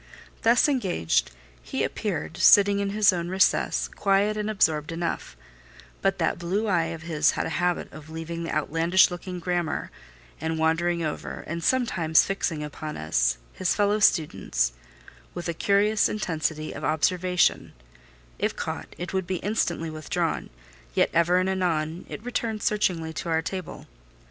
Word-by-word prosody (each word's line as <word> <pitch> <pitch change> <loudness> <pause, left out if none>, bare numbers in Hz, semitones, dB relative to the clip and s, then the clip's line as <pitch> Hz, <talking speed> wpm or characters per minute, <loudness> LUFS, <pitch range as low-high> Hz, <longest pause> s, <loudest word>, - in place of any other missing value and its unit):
Thus 235 +5 +4
engaged, 175 - +1 0.3
he - - -3
appeared, 80 0 -3
sitting 200 0 +6
in 200 0 -1
his 205 -1 +4
own 170 -1 -3
recess, 190 +1 +2
quiet 200 +1 +1
and 210 0 -2
absorbed 160 -7 +1
enough; 165 - -4 0.6
but - - +1
that - - 0
blue 185 +6 -1
eye 175 -6 +2
of 165 -1 -6
his 155 -2 +2
had - - 0
a - - -2
habit 180 0 -1
of 155 0 -11
leaving 165 +1 -5
the 165 - -4
outlandish 165 +5 +3
looking 180 +1 -6
grammar, 175 -2 -2 0.5
and 160 0 -2
wandering 165 +2 +1
over, 155 -1 -4
and 170 +1 -5
sometimes 175 -11 +3
fixing 170 -6 -2
upon 150 +1 -6
us, - - +1 0.2
his 185 - 0
fellow 205 0 +2
students, 95 - +2 0.6
with 175 - -4
a 170 - -1
curious 205 +4 +2
intensity 160 -6 -2
of - - -8
observation: 180 +4 +1 0.7
if - - 0
caught, - - -5
it 175 +2 -5
would 190 -2 -1
be 185 - -1
instantly 170 -6 -1
withdrawn; 155 -1 -2 0.5
yet - - +3
ever 170 +2 +3
and 185 +1 +2
anon, 175 -3 -1
it 210 - -7
returned 230 -3 -2
searchingly 175 -6 0
to 170 - -5
our 160 0 +1
table. 185 -1 -6
170 Hz, 155 wpm, -26 LUFS, 160-195 Hz, 0.7 s, sitting